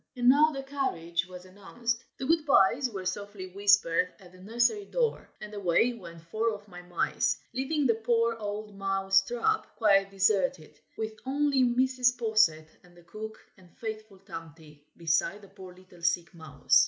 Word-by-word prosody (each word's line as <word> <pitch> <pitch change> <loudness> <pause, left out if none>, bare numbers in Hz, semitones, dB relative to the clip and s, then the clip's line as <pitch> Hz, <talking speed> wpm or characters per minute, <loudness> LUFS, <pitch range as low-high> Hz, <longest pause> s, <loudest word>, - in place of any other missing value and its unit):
And 245 -1 0
now 295 +4 +6
the 275 -2 -5
carriage 185 -12 -2
was 180 0 -11
announced; 230 +5 -4
the 265 - -4
"good 320 +2 +3
byes" 250 +2 +4
were 195 -4 -6
softly 200 +1 -4
whispered 195 -2 +3
at 180 -2 -16
the 185 - -17
nursery 240 - +1
door, 475 0 -1
and 210 0 -9
away 200 +4 +2
went 170 -7 -11
four 220 +7 -1
of 205 0 -14
my 180 -2 -10
mice, 175 -1 0 0.2
leaving 270 +4 0
the 235 - +4
poor 230 +1 +1
old 210 0 -5
Mouse 195 0 +2
trap 245 - 0
quite 195 -3 +3
deserted, 195 - 0 0.2
with 220 0 -3
only 280 0 +2
Mrs. 250 0 +2
Posset 215 -9 +2 0.2
and 175 -1 -21
the 175 - -17
cook 220 +5 -8 0.2
and 180 -2 -19
faithful 215 -4 -7
Tomty, 165 -6 -11 0.2
beside 170 +5 0
the 200 - -14
poor 190 -2 -12
little 185 -1 -18
sick 170 +1 0
mouse. 160 -4 +2
205 Hz, 165 wpm, -29 LUFS, 180-240 Hz, 0.2 s, now